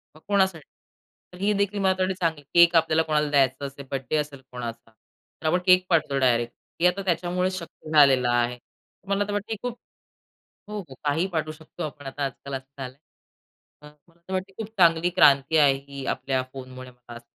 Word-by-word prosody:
मग 155 - -17
कोणासाठी? 190 -6 +1 0.7
तर - - -11
ही 200 +2 +1
देखील 200 0 0
मला 190 -1 +3
त 185 - -13
वाटते 185 +1 +1
चांगली 160 -4 0
केक 170 0 +6
आपल्याला 160 -1 +4
कोणाला 150 -1 0
द्यायचं 135 -1 +2
असेल, 140 0 -11
बर्थडे 135 +2 -2
असेल 145 -2 -4
कोणाचा. 120 -2 -7
तर 150 +7 -11
आपण 180 +3 +3
केक 185 0 +5
पाठवतो 155 -5 +2
डायरेक्ट. 120 -2 +2 0.3
हे 180 - +6
आता 185 +2 0
त्याच्यामुळे 180 +1 0
शक्य 170 -3 -9
झालेलं 135 -5 +5
आहे. 120 0 +1
तर 195 - -38
मला 200 +1 +2
आता 205 0 -5
वाटतं 205 +2 -3
ही 220 - -2
खूप 245 -1 -4 0.9
हो, 210 - -5
हो. 165 -10 -9
काही 150 +5 +1
पाठवू 155 -1 -2
शकतो 155 0 -10
आपण 145 -2 -7
आता 140 +2 -5
आजकाल 135 +1 -6
असं 135 +1 -7
झालंय. 130 +1 -8 0.8
तर 150 - -12 0.2
मला 170 0 -27
तर 190 - -6
वाटते 190 +1 -3
खूप 220 -1 -4
चांगली 170 0 +4
क्रांती 150 -3 +4
आहे 140 -2 +6
ही 140 -1 -7
आपल्या 130 -1 -1
फोन 130 -1 -9
मुळे 130 0 -9
मला 125 -1 -14
असं 120 - -12
155 Hz, 200 wpm, -25 LUFS, 135-180 Hz, 0.9 s, केक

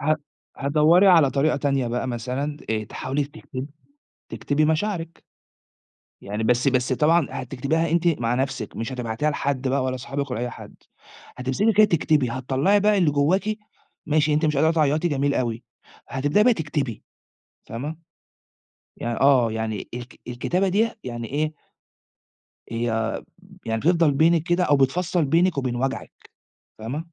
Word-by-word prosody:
ه 155 +2 +2 0.4
هتدوّري 155 +7 +4
على 165 -7 +6
طريقة 140 +3 +1
تانية 140 -3 0
بقى 120 +2 -2
مثلًا 130 +5 -3
آآ، 110 -1 -1
تحاولي 135 +6 -3
تكتبي 140 -2 -8 0.6
تكتبي 150 +2 0
مشاعرِك. 165 +1 -1 1.0
يعني 105 +3 -4
بس 125 +4 +2
بس 130 0 +2
طبعًا 155 +3 +3
هتكتبيها 140 +6 -2
أنتِ 170 +1 +2
مع 120 -7 +1
نفسِك، 135 +1 -3
مش 115 +4 -4
هتبعتيها 125 +4 -1
لحد 135 -2 -2
بقى 135 0 +1
ولا 130 0 -1
أصحابِك 135 +1 -4
ولا 120 - -2
أي 125 0 -2
حد، - - -11 0.6
هتمسكي 130 - +1
كده 215 +2 +6
تكتبي 155 - +1
هتطلّعي 135 - +1
بقى 210 0 +3
اللي 170 -6 +3
جواكِ 190 +9 +1 0.5
ماشي، 150 0 +2
أنتِ 155 +2 +2
مش 150 -1 +1
قادرة 160 +3 +4
تعيّطي، 155 +1 +2
جميل 140 -2 0
أوي، 115 -2 -2 0.5
هتبدئي 145 +10 +2
بقى 250 - +5
تكتبي 145 - -3 0.6
فاهمة، 145 +8 -5 1.0
يع 120 0 -3
آه، 130 -5 +4
يعني 110 -2 -4
الك 120 0 -8
الكتابة 175 +11 -1
دي 215 +5 +2
يعني 120 -2 -5
إيه 155 +2 -1 1.2
يع 115 -1 -1 0.5
يعني 115 0 -1
بتفضَل 165 +1 +3
بينك 160 +3 +3
كده 175 0 +1
أو 145 -5 +3
بتفصّل 170 +5 +1
بينِك 165 +3 +2
وبين 130 -3 -1
وجعِك 135 +2 -4 0.5
فاهمة؟ 115 +7 -4
140 Hz, 145 wpm, -23 LUFS, 125-160 Hz, 1.2 s, على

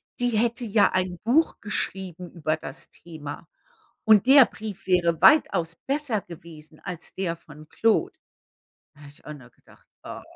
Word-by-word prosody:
Sie 245 0 0
hätte 235 +2 0
ja 210 -2 +3
ein 185 -1 -1
Buch 275 +9 +2
geschrieben 190 -4 -4
über 155 -2 -2
das 135 -3 -8
Thema. 155 -2 -10 0.6
Und 215 +1 +5
der 270 -1 +8
Brief 215 -4 -9
wäre 175 -3 +2
weitaus 165 - +4
besser 275 -6 -1
gewesen 160 -3 -13
als 180 -3 -8
der 180 -3 -2
von 155 -2 -15
Claude. 230 - +1 0.8
Da 150 - -21
habe 145 -1 -13
ich 145 - -17
auch 150 - -6
nur 130 -4 -15
gedacht: - - -24 0.2
„Ah.“ - - -9
180 Hz, 155 wpm, -25 LUFS, 160-225 Hz, 0.8 s, der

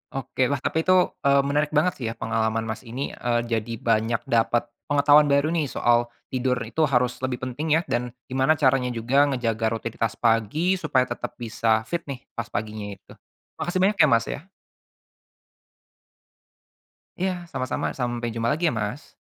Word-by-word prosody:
Oke, 130 -1 0
wah 140 - 0
tapi 160 - 0
itu, 185 +1 +4 0.3
eee, 140 0 +5
menarik 145 +2 0
banget 160 +4 +3
sih 120 - -4
ya 115 - -2
pengalaman 110 0 -1
Mas 110 +2 -5
ini, 130 +4 -4
eee, 120 -1 0
jadi 115 -1 -2
banyak 115 0 +1
dapat 120 -1 +2 0.2
pengetahuan 145 +1 +5
baru 140 +2 +2
nih 165 -4 0
soal 120 -1 +2 0.2
tidur 130 0 +1
itu 115 +8 -1
harus 125 -2 +1
lebih 130 -1 -2
penting 130 +5 -3
ya, - - -2
dan 125 -6 -2 0.2
gimana 130 +4 +2
caranya 135 -4 +2
juga 130 +6 +3
ngejaga 115 -5 -1
rutinitas 115 -1 -3
pagi 120 - +1
supaya 135 -6 +2
tetap - - -5
bisa 115 -1 0
fit 170 +9 -2
nih 135 -2 -6
pas 115 -2 -5
paginya 105 -2 -5
itu. - - -21 0.5
Makasih 175 +3 -1
banyak 200 +1 +2
ya, 155 - +7
Mas, 115 -4 +3
ya. - - -5 2.8
Iya 180 -2 -3
sama-sama. 130 -3 -3
Sampai 120 -2 -2
jumpa 115 0 -1
lagi 165 +4 +1
ya 135 - -1
Mas 110 +6 -4
125 Hz, 165 wpm, -24 LUFS, 115-145 Hz, 2.8 s, ya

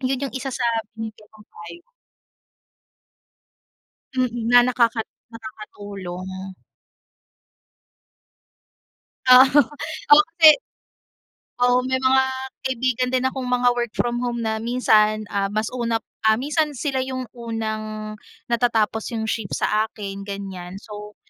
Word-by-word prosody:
'yun 260 0 0
'yung 270 - -10
isa 265 +1 -4
sa 250 -1 -3 0.3
bibigay 220 -1 -8
kong 215 -1 -18
payo. 170 - -11 2.3
Mm, 245 -3 -1
na 245 - +7
nakakat 235 -2 +1 0.2
nakakatulong. 195 -4 -8 2.7
Oo, 260 +3 +8 0.5
oh 300 - +9 0.2
kasi 320 -2 +10 1.1
oo 245 0 +4
may 260 - +1
mga 265 0 +4 0.4
kaibigan 255 -1 0
din 255 0 +1
akong 260 -1 -4
mga 250 0 +3
work 240 -1 -1
from 240 0 0
home 240 -1 -2
na 220 0 -1
minsan, 215 -3 +2
ah, 200 -1 +1
mas 215 +1 -1
una 235 -2 0 0.3
ah, 220 - +5
minsan 295 +2 -1
sila 270 -1 -1
'yung 260 -1 -4
unang 215 -2 -5 0.4
natatapos 225 -2 +1
'yung 220 - -2
shift 220 -4 -3
sa 215 +1 +1
akin, 200 -2 -7
ganyan. 190 -2 -7
So, 210 0 -10
230 Hz, 115 wpm, -22 LUFS, 215-255 Hz, 2.7 s, kasi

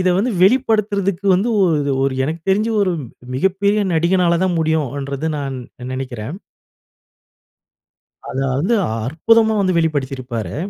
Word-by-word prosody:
இத 185 - +2
வந்து 240 +5 +1
வெளிப்படுத்துறக்கு 200 -4 +2
வந்து 200 +6 +1
ஒ - - +5 0.2
இது 140 -1 -1
ஒரு 135 - 0
எனக்கு 160 +3 -3
தெரிஞ்சு 215 +4 +1
ஒரு 185 -2 +1 0.4
மிகப்பெரிய 195 +7 +1
நடிகனால 170 +1 +2
தான் 180 -2 0
முடியுன்றது 145 -2 -1
நான் 135 -2 -4 0.4
நினைக்கிறேன். 130 +2 -5 1.9
அதாவது 135 - -1 0.3
அற்புதமா 220 - +2
வந்து 185 -2 +1
வெளிப்படுத்தியிருப்பாரு. 130 - -2
165 Hz, 110 wpm, -19 LUFS, 135-200 Hz, 1.9 s, ஒ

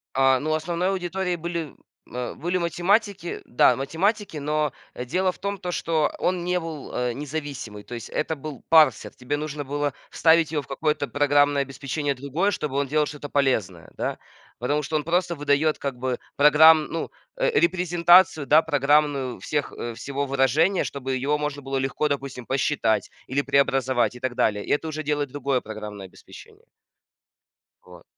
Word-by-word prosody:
А, 135 -1 +4
ну, 155 +3 -1
основной 170 +3 -1
аудиторией 185 -1 -2
были, 170 -3 -4 0.3
м, - - -18
э, 125 -1 -4
были 175 +4 -1
математики. 180 +2 0
Да, 120 - +4
математики, 180 +7 -1
но, 150 0 0 0.2
э, - - -5
дело 185 +8 +1
в - - -19
том, 200 0 -3
то 180 -2 -5
что 160 -3 +1
он 180 -1 0
не 180 0 +1
был, 160 -4 -7
э, 125 -1 -1
независимый. 140 -6 -6
То 120 - -8
есть 115 -1 -8
это 160 +1 -2
был 140 -2 -8
парсер. 155 -7 +4
Тебе 125 +3 -3
нужно 150 -1 -5
было 145 +1 -2 0.2
вставить 160 -1 +3
его 150 - 0
в 135 - -17
какое-то 150 +1 -1
программное 145 0 +3
обеспечение 140 +2 -3
другое, 140 +10 -1
чтобы 150 -7 -3
он 140 0 0
делал 150 +2 +2
что-то 145 0 -7
полезное, 110 - 0
да. - - -2 0.4
Потому 145 +5 0
что 155 +3 -3
он 150 - +1
просто 175 +2 0
выдает 145 +1 +1
как 135 -3 -4
бы 125 0 -2 0.2
програм 150 +2 +7
ну, 165 - -5 0.3
э, - - +1
репрезентацию, 175 -2 +4
да, 155 +2 +6
программную 145 -3 +1
всех, 145 -1 -2
э, 120 - -5
всего 140 +3 -3
выражения, 140 +7 +2
чтобы 135 -1 -4
его 140 +4 0
можно 150 -1 -3
было 135 0 -5
легко, 135 +3 0
допустим, 135 -3 -4
посчитать 130 -3 0 0.2
или 135 +2 0
преобразовать, 135 -3 +1
и - - -10
так 130 -1 -2
далее. 105 -4 +1
И - - -4
это 155 +2 +1
уже 155 0 -4
делает 145 -1 -1
другое 140 -1 -1
программное 105 -3 -8
обеспечение. 95 - -15 1.2
Вот. - - -15
145 Hz, 170 wpm, -24 LUFS, 135-160 Hz, 1.2 s, програм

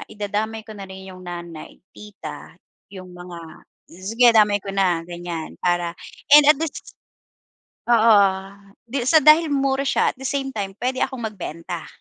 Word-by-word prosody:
idadamay 215 +2 -3
ko 220 - -9
na 195 - -7
rin 190 0 -10
yung 185 0 -12
nanay, 170 -2 -9
tita, 210 -1 -10 0.4
yung 185 -2 -10
mga 175 -1 -10 0.5
sige 225 +8 +3
damay 210 -2 +5
ko 200 - -6
na 185 -4 +1
ganyan 175 -2 -6
para 175 -1 0 0.4
and 295 - +9
at 300 - +7
least. 325 -2 -6 1.0
Oo, 200 -4 +4 0.4
di 255 +2 -3
sa 315 +3 +6
dahil 310 +2 +6
mura 275 -1 +1
siya - - +2
at - - -36
the 265 - -4
same 275 -1 -2
time 200 -2 -3
pwede 255 +1 -2
akong 260 -3 -3
magbenta. 170 -3 -7
205 Hz, 155 wpm, -22 LUFS, 180-250 Hz, 1.0 s, and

